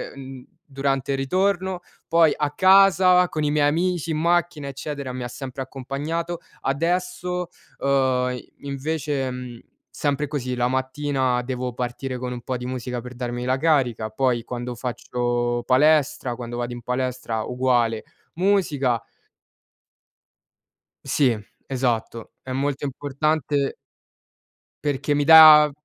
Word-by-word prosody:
uhm, 135 -2 -10 0.2
durante 135 -1 -1
il - - -1
ritorno. 185 +6 0 0.3
Poi, 165 -2 +5
a 150 -1 0
casa 185 0 +5
con 155 - -2
i 145 - +1
miei 145 -1 +3
amici 170 +1 0
in 155 - -1
macchina, 170 -2 0
eccetera, 140 0 -5
mi 125 0 -5
ha - - -3
sempre 130 +1 -7
accompagnato. 145 +6 -4 0.2
Adesso, 180 +4 -1 0.3
uhm, 130 -2 +1 0.2
invece, 140 -1 -2
mhmm, 125 -2 -7 0.3
sempre 145 0 -1
così: 130 -4 -3
la 120 0 +1
mattina 130 -1 0
devo 125 0 -4
partire 125 +2 -4
con 125 0 -4
un 125 - -6
po' 130 - -3
di 125 - -7
musica 125 -1 -4
per 125 +1 -9
darmi 120 0 -4
la 130 +1 +1
carica; 130 -8 +1
poi, 120 0 0
quando 125 0 -5
faccio 120 0 -2
palestra 135 -2 +3
quando 120 -1 -7
vado 120 0 -3
in 120 - -8
palestra, 125 -2 -2
uguale, 120 -3 +1 0.3
musica. 160 - +1 2.0
Sì, 130 -6 +2 0.3
esatto, 120 -3 -2
è 130 - -8
molto 140 +2 -2
importante 145 +1 -1 1.0
perché 145 0 -1
mi 145 0 +2
dà 155 -1 +9
135 Hz, 130 wpm, -23 LUFS, 125-155 Hz, 2.0 s, dà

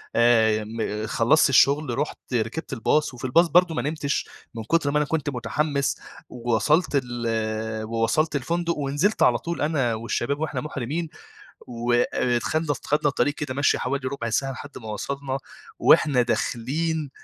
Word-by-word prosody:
آآ، 115 -1 +5
ي 110 0 -1
م 110 -1 -3
خلصت 130 +7 +3
الشغل 140 -1 +3
رُحت 145 +2 -2 0.2
ركبت 120 +6 -2
الباص 135 +4 +1
وفي 125 - -7
الباص 165 +7 +4
برضه 175 -1 +3
ما 120 - 0
نمتش، 150 +1 -2 0.3
من 115 - -5
كتر 150 +1 +1
ما 150 - +1
أنا 150 - +2
كنت 150 -1 -1
متحمس، 140 +3 -1 0.3
وصلت 125 +8 +1
ال 120 -1 -4 0.6
ووصلت 115 +8 0
الفندق، 170 +4 -1
ونزلت 145 +9 +1
على 120 -1 +4
طول 170 +8 -5
أنا 145 -6 +1
والشباب 120 +5 -2
وإحنا 160 - -2
مُحرمِين. 150 +3 -4 0.6
و 120 0 -2
آآ، 120 0 +1
ت - - -10
خدنا 155 -1 0
اس - - -3
خدنا 150 0 +2
الطريق 145 +1 0
كده 145 -3 -4
مَشيِّ 140 +2 +2
حوالي 135 0 -2
ربع 120 -4 -4
ساعة 135 +4 0
لحد 145 +2 -9
ما 110 - -10
وصلنا 135 +4 -3 0.4
وإحنا 135 -4 +5
داخلين 145 +6 -1
140 Hz, 165 wpm, -24 LUFS, 120-150 Hz, 0.6 s, آآ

